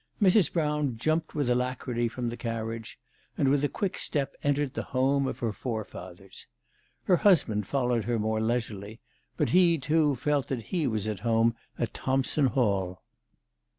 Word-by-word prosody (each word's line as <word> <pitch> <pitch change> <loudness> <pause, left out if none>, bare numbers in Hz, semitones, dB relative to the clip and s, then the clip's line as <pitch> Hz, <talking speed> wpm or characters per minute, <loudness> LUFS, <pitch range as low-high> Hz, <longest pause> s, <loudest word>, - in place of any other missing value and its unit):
Mrs. 195 -4 +4
Brown 150 -6 0
jumped 155 +7 -1
with 145 -4 0
alacrity 125 -1 0
from 120 +1 -3
the 120 - -5
carriage, 115 -1 -5 0.4
and 135 - +3
with 140 +1 +2
a 145 - +2
quick 200 -4 -2
step 140 -3 -2
entered 145 -1 +1
the - - -2
home 135 +1 +1
of - - -3
her 115 -3 -2
forefathers. 100 -5 -7 0.6
Her 180 - +4
husband 130 - +3
followed 125 -5 0
her 120 -1 0
more 110 0 0
leisurely, 110 -2 -2 0.4
but - - +1
he, 175 -2 +5
too, 150 0 +2
felt 140 +2 0
that 125 -5 -4
he 170 -5 +1
was 110 -3 -1
at 105 -3 -3
home 115 +1 +2 0.2
at 120 - -2
Thompson 135 +2 +1
Hall. 100 -8 0
125 Hz, 160 wpm, -28 LUFS, 115-145 Hz, 0.6 s, he